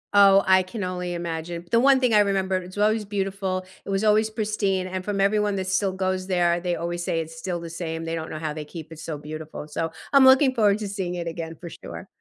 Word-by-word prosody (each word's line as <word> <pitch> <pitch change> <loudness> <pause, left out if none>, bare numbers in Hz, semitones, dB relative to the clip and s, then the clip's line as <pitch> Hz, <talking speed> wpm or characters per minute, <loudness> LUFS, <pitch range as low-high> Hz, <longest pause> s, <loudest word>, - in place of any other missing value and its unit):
Oh, 195 -1 +7
I 190 0 +5
can 185 +3 -6
only 180 -1 -3
imagine. 170 0 -4
The 230 - +5
one 270 +1 +5
thing 250 -3 +2
I 210 - +6
remember, 195 -2 +1
it's 185 +1 -8
always 215 +1 +2
beautiful, 195 -2 -2 0.2
it - - -9
was 195 +2 0
always 215 +1 +4
pristine, 210 -4 -1
and 185 0 -4
from 205 0 -2
everyone 205 +1 +2
that 190 -1 -2
still 190 +1 +1
goes 185 0 -2
there, 175 -2 +2
they 175 0 -1
always 175 +1 -3
say 165 - -1
it's 160 0 -6
still 175 +1 -4
the 170 - -7
same, 165 -1 -4
they 165 - -3
don't 160 -1 -4
know 155 - -5
how 155 -1 -3
they 155 - -5
keep 160 0 -9
it 160 - -10
so 160 -2 -5
beautiful, 155 0 -8
so, 165 +2 -3 0.2
I'm 275 -1 +7
looking 265 0 +6
forward 210 -4 +3
to 210 - -4
seeing 190 -3 -3
it 170 - -4
again 165 0 -5
for 175 - -8
sure. - - -9
185 Hz, 245 wpm, -24 LUFS, 170-205 Hz, 0.2 s, Oh